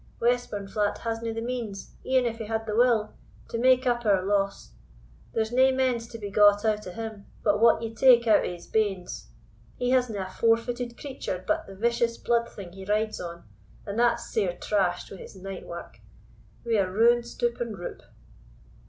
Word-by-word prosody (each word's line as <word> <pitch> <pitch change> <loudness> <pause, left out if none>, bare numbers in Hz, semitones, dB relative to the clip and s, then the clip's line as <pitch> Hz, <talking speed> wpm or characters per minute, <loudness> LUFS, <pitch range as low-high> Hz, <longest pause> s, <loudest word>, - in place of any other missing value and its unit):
Westburnflat 210 -4 0
hasna 230 0 -3
the 225 0 -4
means, 235 -5 -5
e'en 260 -1 +2
if 230 -1 -2
he 225 - -4
had 220 +1 -2
the 210 -1 -3
will, 230 -3 +3 0.3
to 230 - -4
make 255 +1 +4
up 240 -1 +1
our 200 -4 +3
loss; 200 0 -1 0.6
there's 220 0 -1
nae 260 +2 +5
mends 255 -3 0
to 230 - -8
be 205 -2 -6
got 205 +1 +5
out 210 -2 0
o' - - -5
him, 220 0 -7 0.2
but 205 -1 +3
what 230 0 +5
ye 225 0 -4
take 240 0 +6
out 220 -2 +5
o' - - -2
his 175 -1 -9
banes. 195 -5 -1 0.5
He 245 0 0
hasna 245 -6 +1
a - - -11
four 225 +3 +3
footed 240 0 -5
creature 260 -10 -5
but - - 0
the 195 - -10
vicious 235 +2 +1
blood 235 0 +1
thing 190 -4 -10
he 190 0 -9
rides 215 +2 -1
on, 170 -1 -7 0.4
and 205 +2 -3
that's 235 0 +2
sair 185 -5 0
trash'd 185 -4 0
wi' 195 - -8
his - - -11
night 190 0 -8
wark. 170 0 -9 0.7
We 230 -2 +2
are 185 -2 0
ruined 235 +4 +4
stoop 240 0 -2
and 230 -4 -3
roop." 175 - -7
225 Hz, 190 wpm, -27 LUFS, 200-235 Hz, 0.7 s, take